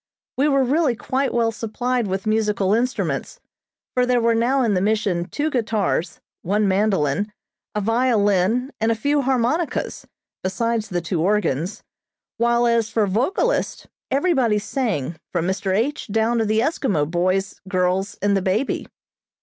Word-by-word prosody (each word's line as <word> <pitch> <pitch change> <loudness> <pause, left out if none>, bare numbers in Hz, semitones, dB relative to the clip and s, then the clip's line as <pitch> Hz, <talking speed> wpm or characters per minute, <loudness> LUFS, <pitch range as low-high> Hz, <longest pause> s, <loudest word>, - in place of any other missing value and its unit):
We 280 +3 +2
were 275 -2 +3
really 275 0 +2
quite 265 +4 -1
well 230 -1 +1
supplied 235 +2 -2
with 190 +2 -3
musical 210 -3 +1
instruments, 250 - -1 0.5
for 250 - +2
there 250 -1 +3
were 230 0 +3
now 250 +4 +2
in 220 -4 +2
the 180 - +1
Mission 200 -4 0
two 305 +1 -1
guitars, 215 - -1 0.2
one 205 +3 +1
mandolin, 195 -2 +1 0.4
a 210 - 0
violin 225 +1 +2
and 225 +1 +2
a - - +1
few 285 +6 +1
harmonicas, 265 +5 -1 0.4
besides 225 +3 -1
the 175 -1 -1
two 170 0 -2
organs, 195 -1 0 0.5
while 235 +1 +2
as 230 -2 +2
for 220 -1 +1
vocalists 265 - 0 0.2
everybody 270 -8 +2
sang 205 - -2
from 170 -2 -1
Mr. 190 +1 -1
H. 240 +11 -1
down 225 +2 +1
to 225 - +1
the 215 +1 +2
Eskimo 240 - 0
boys, 185 +4 -1
girls 185 +1 0
and 205 -1 +3
the 195 - +1
baby. 195 +8 -1
220 Hz, 150 wpm, -22 LUFS, 195-250 Hz, 0.5 s, were